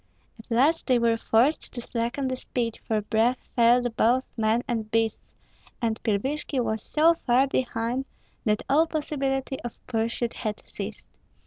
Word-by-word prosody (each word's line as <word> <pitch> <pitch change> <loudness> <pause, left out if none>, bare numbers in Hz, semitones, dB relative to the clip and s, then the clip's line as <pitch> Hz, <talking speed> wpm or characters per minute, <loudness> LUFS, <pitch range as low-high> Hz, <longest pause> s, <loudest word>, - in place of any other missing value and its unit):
At 225 - -14
last 275 +8 +2
they 255 -2 +4
were 235 -1 +3
forced 235 +6 +2
to 245 - -4
slacken 240 +3 -2
the 260 - -1
speed, 235 -2 -3
for 215 -1 +1
breath 225 +4 +2 0.2
failed 240 0 +4
both 250 +3 +3
men 225 +1 +1
and 225 -4 -2
beasts, 225 0 -1 0.4
and 225 -2 -1
Pilvishki 265 +7 -1
was 220 -3 -1
so 320 +7 +4
far 260 -4 +2
behind 250 -1 -1 0.4
that 210 -2 +1
all 310 +4 +4
possibility 275 -4 -2
of 240 - -7
pursuit 230 +1 -1
had 215 -3 -5
ceased. - - -7
240 Hz, 150 wpm, -26 LUFS, 225-270 Hz, 0.4 s, they